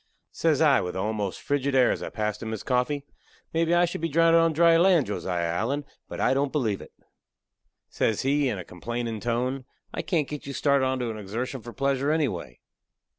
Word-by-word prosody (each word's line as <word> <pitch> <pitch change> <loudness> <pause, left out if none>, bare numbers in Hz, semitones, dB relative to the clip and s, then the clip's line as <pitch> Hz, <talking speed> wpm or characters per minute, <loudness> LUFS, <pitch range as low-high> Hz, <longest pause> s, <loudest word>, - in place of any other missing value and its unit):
Says 160 -3 +1
I, 150 -3 +5
with 90 0 -4
a - - -2
almost 105 -1 -2
frigid 140 -1 0
air 130 -2 +5
as - - -3
I - - -4
passed 105 -1 -3
him 110 - -4
his 110 -2 -4
coffee, 135 +3 0 0.5
"Mebee 165 +1 +2
I 175 0 +5
shall 170 - -5
be 165 - -1
drounded 165 +2 +5
on 165 0 +3
dry 165 +1 +5
land, 170 -4 +5
Josiah 90 -4 -2
Allen, 120 +13 -1 0.2
but - - -7
I - - +3
don't 140 +1 0
believe 115 -10 -1
it." - - -12 1.0
Says 110 - 0
he, 140 0 +2
in 110 - -2
a 90 - -6
complainin' 115 +4 -4
tone: 125 +2 -1 0.3
"I - - -2
can't 160 -6 0
get 150 -2 -7
you 140 - -4
started 140 -1 +2
onto 130 -3 -1
a - - -6
exertion 115 +6 -4
for 120 - -9
pleasure 140 +2 0
anyway." 130 - -1
130 Hz, 205 wpm, -26 LUFS, 110-150 Hz, 1.0 s, I